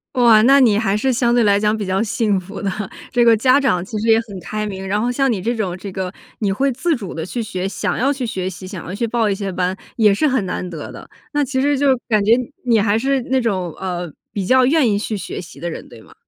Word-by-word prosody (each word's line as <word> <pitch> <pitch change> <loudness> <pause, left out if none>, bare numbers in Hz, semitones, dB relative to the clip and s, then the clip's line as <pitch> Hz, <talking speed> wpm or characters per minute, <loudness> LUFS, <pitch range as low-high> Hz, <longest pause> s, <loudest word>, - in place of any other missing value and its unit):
哇， 235 -4 +6
那 270 +5 +6
你 220 -6 +4
还 205 -2 +1
是 260 +4 +1
相 240 0 +2
对 240 -1 +4
来 200 -1 +4
讲 210 +1 +1
比 210 - -3
较 190 +1 0
幸 215 -2 0
福 195 +2 -9
的， 200 - -1 0.4
这 245 -1 +3
个 230 -1 +5
家 255 +5 +4
长 180 -11 +1
其 215 +2 -5
实 220 - -2
也 225 0 +5
很 205 -5 -9
开 215 +4 -4
明。 195 -2 -5
然 205 +2 0
后 240 +3 0
像 270 +1 +1
你 205 -5 -2
这 235 +5 -1
种 190 -5 -2
这 195 +1 -7
个 185 -1 -4 0.3
你 205 -3 0
会 270 +8 +1
自 310 +7 0
主 200 -8 -7
地 160 - -4
去 235 +5 -4
学， 185 -3 -3
想 195 - -2
要 265 +4 +2
去 265 -3 -3
学 190 -5 -3
习， 185 0 -9
想 185 -2 -7
要 180 - -5
去 235 - -1
报 225 -1 +1
一 200 - 0
些 195 -1 -4
班， 185 0 -1 0.2
也 215 -3 +4
是 305 +10 +2
很 260 -6 +1
难 180 0 -3
得 165 -4 -7
的， - - -11 0.3
那 295 0 +2
其 260 0 -1
实 285 +1 +2
就 285 +1 +2 0.2
感 215 -3 +3
觉 210 - +2 0.3
你 235 -3 +4
还 205 +1 +2
是 270 +3 +1
那 265 +2 +1
种， 190 -8 -1
呃， 180 -3 -4 0.2
比 200 -3 -2
较 255 +5 +4
愿 280 -2 +3
意 200 - +1
去 215 +1 -3
学 185 -2 -5
习 175 - -11
的 175 - -3
人， 160 - -8
对 - - -14
吗？ - - -18
215 Hz, 295 characters per minute, -19 LUFS, 190-245 Hz, 0.4 s, 哇